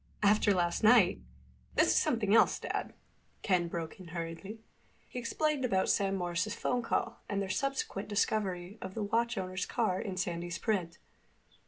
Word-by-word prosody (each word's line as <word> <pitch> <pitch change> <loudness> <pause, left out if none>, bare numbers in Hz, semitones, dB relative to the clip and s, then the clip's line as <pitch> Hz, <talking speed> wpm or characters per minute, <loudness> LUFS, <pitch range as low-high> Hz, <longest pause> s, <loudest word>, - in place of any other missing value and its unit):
"After 205 0 +4
last 175 +1 +1
night—" 215 -5 +6 0.5
"This - - +4
is - - +3
something 230 - +2
else, 230 - +5
Dad," - - -4 0.5
Ken 180 -3 +2
broke 170 +1 -5
in 185 - -10
hurriedly. 170 +6 -6 0.5
He 250 - -6
explained 295 +4 0
about 190 -6 +1
Sam 195 -1 +1
Morris's 180 +3 -1
phone 245 +1 0
call 230 - -1
and 200 - -1
their 195 -1 -2
subsequent 270 -5 -2
discovery 200 -2 -1
of 190 0 -7
the 220 - -2
watch 230 +3 0
owner's 185 -1 -3
car 185 0 0
in 190 -3 -5
Sandy's 175 -1 -2
print. 180 -7 -1
195 Hz, 160 wpm, -32 LUFS, 180-220 Hz, 0.5 s, night